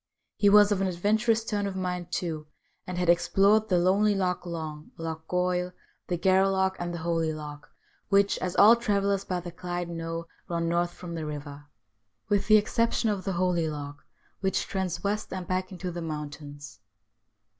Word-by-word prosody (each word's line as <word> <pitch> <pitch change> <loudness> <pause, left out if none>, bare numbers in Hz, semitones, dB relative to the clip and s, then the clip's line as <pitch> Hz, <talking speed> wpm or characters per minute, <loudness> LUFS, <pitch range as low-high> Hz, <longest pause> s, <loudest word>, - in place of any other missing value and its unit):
He 205 - +4
was 205 0 +7
of 195 -2 +1
an 195 - +2
adventurous 220 +5 +1
turn 205 -3 -1
of 195 - -5
mind, 180 -2 -3
too, 155 -4 -3 0.4
and 180 -1 -4
had 180 -1 0
explored 195 +5 +4
the 180 - +3
lonely 200 +4 +3
Loch 180 -2 -1
Long, 155 -3 -6
Loch 160 -1 -5
Goil, 180 0 0 0.3
the 175 - -1
Gareloch, 190 +1 +3
and 175 0 -3
the 170 - -4
Holy 165 -1 0
Loch, 150 -1 -8 0.4
which, 200 0 +3
as 180 -1 -3
all 220 +3 +8
travellers 200 -4 0
by 180 -2 -2
the 175 0 -7
Clyde 175 0 -4
know, 165 0 -4 0.2
run 170 -1 -1
north 175 +1 0
from 175 -1 -8
the 160 -2 -4
river, 145 -1 -7 0.6
with 205 -1 +1
the 215 0 +8
exception 230 +1 +1
of 195 -2 -4
the 195 - -1
Holy 175 -2 +1
Loch, 145 -1 -7 0.4
which 190 -1 0
trends 190 -2 -3
west, 210 +1 -2
and 185 -1 -4
back 185 +1 -2
into 180 -1 -5
the 175 0 -5
mountains. 145 -4 -7
180 Hz, 175 wpm, -28 LUFS, 165-195 Hz, 0.6 s, all